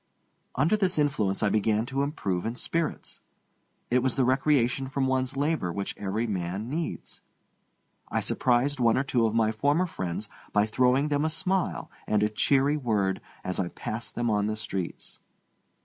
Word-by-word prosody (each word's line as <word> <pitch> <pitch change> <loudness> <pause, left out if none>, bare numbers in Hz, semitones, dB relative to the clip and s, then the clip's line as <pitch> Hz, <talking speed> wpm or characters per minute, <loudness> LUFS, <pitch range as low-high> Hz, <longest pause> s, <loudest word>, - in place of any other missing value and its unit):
Under 150 +10 +3
this 190 -4 +1
influence 115 -10 +1
I 110 - +3
began 110 +1 +1
to 135 +2 -2
improve 100 - -1
in 115 +1 -3
spirits. 165 +5 -2 0.7
It 125 +1 +4
was 130 -1 +1
the 130 - +2
recreation 130 -1 +2
from 135 0 -1
one's 130 0 0
labor 145 - 0
which 100 +3 -3
every 105 +4 -2
man 100 +2 -3
needs. 165 +2 -4 0.9
I - - 0
surprised 130 +3 +1
one 115 -2 +4
or 130 - +2
two 120 -4 +2
of 110 - -2
my 110 -1 +3
former 145 +10 +2
friends 95 - -4 0.3
by 105 0 +4
throwing 125 +6 +2
them 145 0 +1
a 160 - +1
smile 190 +3 -1 0.2
and 105 -1 +2
a 105 - +2
cheery 140 +6 +2
word 105 -8 0 0.2
as 90 - -2
I 95 - 0
passed 110 +5 -5
them 120 0 0
on 105 -1 +1
the 110 0 -2
streets. 95 -4 -5
120 Hz, 170 wpm, -27 LUFS, 105-140 Hz, 0.9 s, It